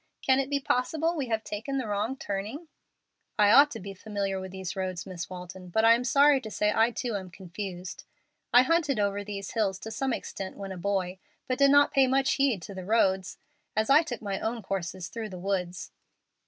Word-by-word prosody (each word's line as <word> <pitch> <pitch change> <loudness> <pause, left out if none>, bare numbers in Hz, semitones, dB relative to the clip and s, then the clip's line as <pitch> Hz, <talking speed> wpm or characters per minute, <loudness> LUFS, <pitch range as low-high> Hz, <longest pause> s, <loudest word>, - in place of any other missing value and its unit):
Can 260 0 +4
it 270 0 -1
be 285 -1 +1
possible 310 +6 0
we 280 -5 -2
have 225 -1 -1
taken 230 +7 -4
the 260 - -2
wrong 210 +5 -2
turning?" 215 - -5 0.7
"I 205 -1 +5
ought 280 +5 +8
to - - -7
be 195 +1 -7
familiar 195 -1 -3
with 190 0 -7
these 190 -1 -5
roads, 185 -2 -3
Miss 175 -2 -6
Walton, 180 0 -9
but 220 +5 +2
I 230 - +8
am 235 +1 +1
sorry 280 +1 +5
to 220 - -7
say 210 0 +1
I 225 +1 +4
too 240 -1 -3
am 190 -2 -5
confused. 180 0 -7 0.5
I 245 +1 +7
hunted 300 -5 +1
over 200 0 0
these 200 -1 -6
hills 205 -5 0
to 220 - -6
some 265 +3 -1
extent 195 -4 -5
when 195 -1 -6
a - - -5
boy, 185 0 -2 0.3
but 255 0 -1
did 280 0 +6
not 285 +1 +5
pay 270 -1 +5
much 265 +1 +2
heed 260 -10 +1
to 200 - -8
the 190 -1 -7
roads, 190 -2 +1 0.4
as 220 +4 +1
I 295 +3 +8
took 245 -9 -6
my 195 -2 -2
own 225 0 -3
courses 185 -2 -4
through 225 -2 -6
the 185 - -8
woods." 180 -2 -3
210 Hz, 215 wpm, -28 LUFS, 190-260 Hz, 0.7 s, ought